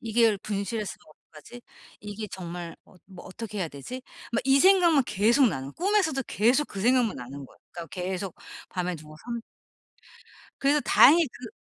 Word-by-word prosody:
'이걸 225 -2 +2
분실했으면 205 +1 -4
어떡하지? 155 +8 -15 0.4
이게 210 +1 -6
정말 175 -2 -7
어 - - -22
뭐 185 -2 -12
어떻게 210 +2 -7
해야 180 -4 -1
되지?' 155 - -8 0.3
막 235 - +1
이 270 +1 +4
생각만 355 -6 +5
계속 230 +6 +3
나요. 135 -6 -5
꿈에서도 370 -8 +1
계속 250 +8 +2
그 195 - -7
생각만 245 +1 +2
나는 135 +3 -8
거야. - - -21 0.2
그러니까 170 -1 -7
계속 185 0 -4 0.3
밤에 180 0 -3
누워서 155 0 -14 1.4
그래서 285 +2 +3
다행히 325 +3 +6
그 250 - -11
210 Hz, 335 characters per minute, -26 LUFS, 180-260 Hz, 1.4 s, 다행히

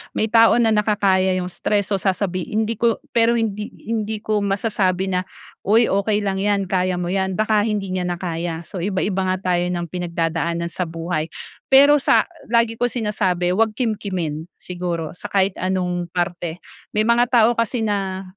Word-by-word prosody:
May 220 0 0
tao 230 0 +6
na 235 -2 +3
nakakaya 200 -3 +2
yung 180 0 -3
stress, 205 +2 -1
so 200 - +1
sasabihin 190 +2 -1
hindi 220 0 -3
ko 235 -1 +1
pero 235 0 +3
hindi 210 -2 -2 0.2
hindi 220 -1 -3
ko 215 -1 0
masasabi 195 -2 0
na, 185 0 -1 0.3
"Uy 225 +4 +3
okey 205 +2 +1
lang 195 -1 -1
'yan, 200 -1 0
kaya 185 -1 +1
mo 175 0 -3
yan." 190 -1 0
Baka 215 +1 +2
hindi 205 -3 -2
niya 185 -1 -1
na 175 - -1
kaya, 170 -1 -4
so 180 - -7
iba-iba 190 +1 -1
nga 185 0 -1
tayo 175 0 +1
ng 175 -2 -3
pinagdadaanan 170 -1 -2
sa 180 0 -3
buhay. 165 -1 -3 0.4
Pero 285 +2 +7
sa - - +4 0.2
lagi 230 0 +1
ko 245 - +2
sinasabi 200 -7 0
'wag 215 +3 +1
kimkimin, 185 - -3
siguro 175 -3 -4
sa 195 - -8
kahit 195 -1 +2
anong 180 -2 -1
parte, 175 -1 -3 0.3
may 215 - +3
mga 235 +2 +3
tao 235 -2 +4
kasi 230 +1 0
na 195 -3 -2
195 Hz, 175 wpm, -21 LUFS, 180-215 Hz, 0.4 s, Pero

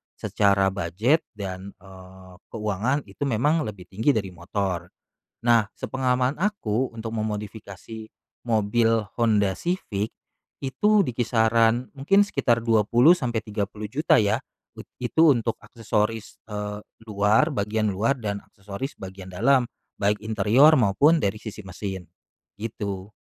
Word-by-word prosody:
secara 100 -1 +2
budget 100 - +1
dan, 95 -1 -7
eee, 95 -1 -14 0.2
keuangan, 110 +6 -1
itu - - -7
memang 145 +7 +2
lebih 100 -4 -8
tinggi 110 +9 +1
dari 100 -4 -2
motor. 90 0 -3 0.6
Nah, 115 -3 +5
sepengalaman 130 +1 -1
aku, 130 - -1
untuk 115 0 -6
memodifikasi, 110 0 -6 0.4
mobil 115 0 +2
Honda 105 -5 +2
Civic, 110 - -3 0.5
itu 200 - +2
di - - -1
kisaran, 115 0 +2
mungkin 195 +9 +3
sekitar 125 - +1
Rp20.000.000-Rp30.000.000 115 - +2
ya, 105 -2 +2 0.4
ut - - -9 0.2
itu 155 +6 +4
untuk 115 -3 0
aksesoris, 110 -1 -3
eee, 105 0 -5 0.2
luar, 105 +6 +3
bagian 105 +1 0
luar, 110 +8 0
dan 100 -3 -4
aksesoris 100 +8 -8
bagian 95 0 -9
dalam, 125 +8 +3 0.3
baik 105 0 0
interior 110 +8 +4
maupun 140 +7 +3
dari 100 +2 0
sisi 105 -1 -8
mesin, 95 0 -6 0.6
gitu. 105 -3 -5
110 Hz, 115 wpm, -24 LUFS, 100-125 Hz, 0.6 s, Nah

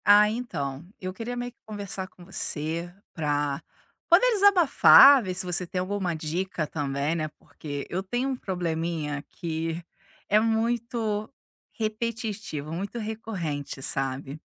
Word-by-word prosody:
Ah, 205 +1 +8
então, 150 - -4 0.2
eu 185 0 -4
queria 235 +4 -5
meio 245 0 -3
que 245 - -44
conversar 200 -3 -4
com 180 -2 -16
você 165 -1 -2 0.2
pra 145 -3 -1 0.5
poder - - +6
desabafar, 350 - +8
ver 185 -2 -3
se 185 - 0
você 180 0 0
tem 180 - -3
alguma 185 -2 -1
dica 165 +2 -2
também, 145 0 -2
né, 155 -2 -1
porque 145 -2 -7
eu 185 - -1
tenho 245 +7 -2
um 265 - -1
probleminha 165 - -2
que 165 0 -3 0.5
é 210 - +5
muito 225 -1 0 0.5
repetitivo, 215 -8 -3
muito 200 +7 -4
recorrente, 205 - -4
sabe. 135 +3 -2
185 Hz, 130 wpm, -27 LUFS, 155-220 Hz, 0.5 s, Ah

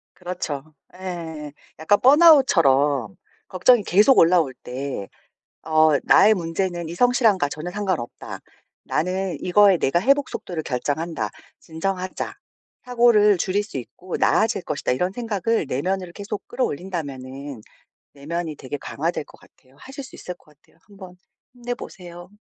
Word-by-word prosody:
그렇죠. 155 -5 -6 0.2
예예. 165 -5 -7 0.3
약간 205 +6 +3
번아웃처럼 165 - +5 0.3
걱정이 210 +5 +3
계속 210 +9 +4
올라올 165 -5 +4
때 130 -5 -5 0.6
어 155 0 +4
'나의 215 +2 +6
문제는 175 -1 -3
이 170 - -6
성실함과 225 - +3
전혀 155 +4 -6
상관없다. 190 - -4 0.5
나는 185 +2 -2
이거에 195 +1 +5
내가 170 +1 +1
회복 275 +6 +2
속도를 170 -3 -5
결정한다. 150 +6 -2 0.3
진정하자. 185 +3 -4 0.5
사고를 235 -4 +4
줄일 190 +4 0
수 205 - -9
있고 170 +8 -6
나아질 220 -3 +2
것이다.' 150 -5 -2
이런 180 +8 0
생각을 225 -3 -1
내면으로 180 +6 -2
계속 205 0 -6
끌어올린다면은 140 - -5 0.5
내면이 160 +2 -5
되게 135 +2 -6
강화될 160 +3 -3
것 - - -18
같아요. 130 +1 -24
하실 270 - -9
수 - - -13
있을 180 - -7
것 150 -3 -25
같아요. - - -30
한번 195 -3 -13 0.4
힘내 245 0 -4
보세요. 175 -5 -11
180 Hz, 315 characters per minute, -22 LUFS, 150-205 Hz, 0.6 s, 나의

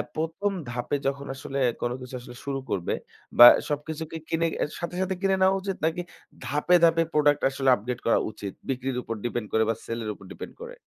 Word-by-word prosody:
প্রথম 165 +6 -1
আ 145 - -11
ধাপে 125 +4 -2
যখন 140 0 -2
আসলে 135 +1 -6 0.2
কোন 120 - 0
কিছু 125 +1 -9
আসলে 125 0 -11
শুরু 135 -1 -2
করবে 90 -3 -1 0.4
বা 120 - +12 0.2
সবকিছুকে 155 +2 -4
কিনে 165 0 +1 0.3
সাথে 175 0 -4
সাথে 190 0 0
কিনে 195 -1 +3
নেওয়া 190 +1 +5
উচিত? 195 0 -3
নাকি 165 +2 0 0.4
ধাপে 150 +6 +3
ধাপে 165 0 +5
প্রোডাক্ট 145 -1 +3
আসলে 135 0 0
আপডেট 120 +3 -5
করা 115 - +4
উচিত? 100 -2 -7 0.2
বিক্রির 130 -1 -2
উপর 115 - -4
ডিপেন্ড 120 -2 -2
করে 110 - +4
বা 115 - +1
সেল 115 0 -4
এর 105 - -3
উপর 100 - -15
ডিপেন্ড - - -8
করে? 480 +1 -8
140 Hz, 200 wpm, -26 LUFS, 120-165 Hz, 0.4 s, বা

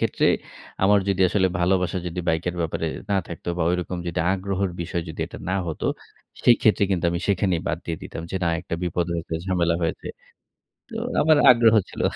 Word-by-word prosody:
ক্ষেত্রে - - +1 0.6
আমার 100 +1 +5
যদি 95 -1 0
আসলে 95 -1 +2
ভালোবাসা 90 0 +1
যদি 90 +1 -3
বাইকের 85 +2 0
ব্যাপারে 80 0 -2 0.2
না 100 - +3
থাকতো 85 0 -7
বা - - +1
ঐরকম 90 0 -2
যদি 85 0 -1
আগ্রহের 95 -1 -2
বিষয় 85 0 -3
যদি 80 - -7
এটা - - -10
না 95 - +1
হতো, 80 - -3 0.6
সেক্ষেত্রে 110 -3 +5
কিন্তু 90 -2 0
আমি 85 +1 -2
সেখানেই 95 -3 +1
বাদ - - -1
দিয়ে 85 - -2
দিতাম - - -7
যে - - -2
না - - +2
একটা 85 - -5
বিপদ 90 0 0
হয়েছে, 85 -1 -4
ঝামেলা 85 -3 +1
হয়েছে। 80 - -2 0.8
তো - - -10 0.3
আমার 155 0 +5
আগ্রহ 115 -2 +6 0.2
ছিল। - - -9
90 Hz, 185 wpm, -24 LUFS, 85-95 Hz, 0.8 s, আগ্রহ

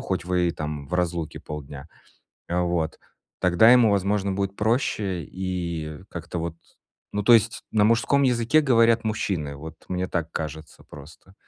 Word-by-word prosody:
хоть 90 -3 -3
вы 90 -1 +1
и - - +1
там 75 -3 -5
в 90 - -3
разлуке 85 -2 -2
полдня. 75 -2 -8 0.6
Вот. 85 -2 -1 0.4
Тогда 90 +6 +5
ему, 125 -3 +6
возможно, 100 0 +1
будет 100 0 -2
проще 105 -5 0
и 85 -3 -4
как-то 85 +1 -6
вот 85 0 -4 0.6
Ну, 105 0 -1
то 120 - +6
есть 115 0 +3
на 105 -2 +3
мужском 115 +6 +3
языке 125 +3 +3
говорят 115 -4 +4
мужчины, 90 -9 -2
вот 80 +2 -9
мне 90 0 -2
так 85 -2 -3
кажется 80 0 -6
просто. 75 +6 -14
90 Hz, 150 wpm, -24 LUFS, 80-105 Hz, 0.6 s, ему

